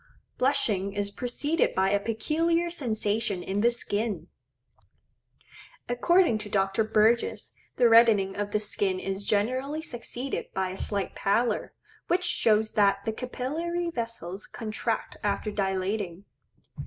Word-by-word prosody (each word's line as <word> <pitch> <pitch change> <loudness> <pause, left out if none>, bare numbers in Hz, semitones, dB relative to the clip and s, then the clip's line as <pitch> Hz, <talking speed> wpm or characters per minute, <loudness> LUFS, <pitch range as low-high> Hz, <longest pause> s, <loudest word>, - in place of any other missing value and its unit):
Blushing 205 -7 +1
is 200 0 -2
preceded 285 +8 0
by 190 +1 +2
a 200 - +3
peculiar 330 +11 0
sensation 215 - -1
in 195 +3 -1
the 235 - +5
skin. 205 -6 -2 1.6
According 245 +1 +3
to 210 -1 -7
Dr. 195 +2 +1
Burgess 220 +2 +2 0.2
the 245 - +5
reddening 225 -4 +5
of 205 0 -2
the 210 - 0
skin 200 -2 -1
is 195 +1 -3
generally 255 +10 0
succeeded 250 -1 -5
by 190 -1 0
a - - -6
slight 200 -2 -2
pallor, 220 +3 0 0.3
which 360 +1 +2
shows 220 -10 +3
that 200 -1 +2
the 220 - -1
capillary 325 +9 -3
vessels 230 - -4
contract 225 0 -3
after 205 +1 -1
dilating. 195 -1 -2
215 Hz, 125 wpm, -27 LUFS, 200-250 Hz, 1.6 s, the